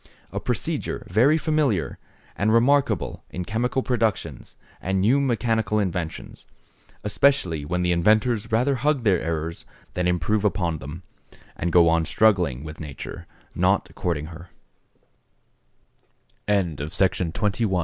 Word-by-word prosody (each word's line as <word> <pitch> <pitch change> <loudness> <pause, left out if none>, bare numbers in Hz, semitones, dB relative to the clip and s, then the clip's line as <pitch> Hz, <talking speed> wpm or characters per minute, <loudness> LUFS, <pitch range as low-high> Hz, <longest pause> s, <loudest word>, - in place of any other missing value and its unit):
A - - -3
procedure - - -3
very 130 - +4
familiar, 145 - 0 0.4
and 105 +2 +1
remarkable 115 - +2
in 90 0 -5
chemical 125 +5 -1
productions, 115 -4 -2 0.3
and 95 +1 0
new 115 +9 +4
mechanical 115 -5 0
inventions; 90 -5 -4 0.6
especially 100 - +2
when 90 +3 -1
the 90 - +2
inventors 110 +5 +2
rather 125 +5 +2
hug 145 0 +1
their 95 -6 +3
errors 80 0 -3 0.3
than 90 0 0
improve 90 +5 +1
upon 85 -6 0
them, 75 +7 -8 0.5
and 85 - -2
go 85 0 +6
on 80 0 +3
struggling 90 - +2
with 75 0 -9
nature, 75 -4 -8 0.3
not - - +1
courting 80 -4 -2
her. 85 +1 -11 2.0
XXI.—DEUCALION, 90 -8 0
OR - - -2
RESTITUTION. 90 0 0
95 Hz, 125 wpm, -24 LUFS, 85-115 Hz, 2.0 s, go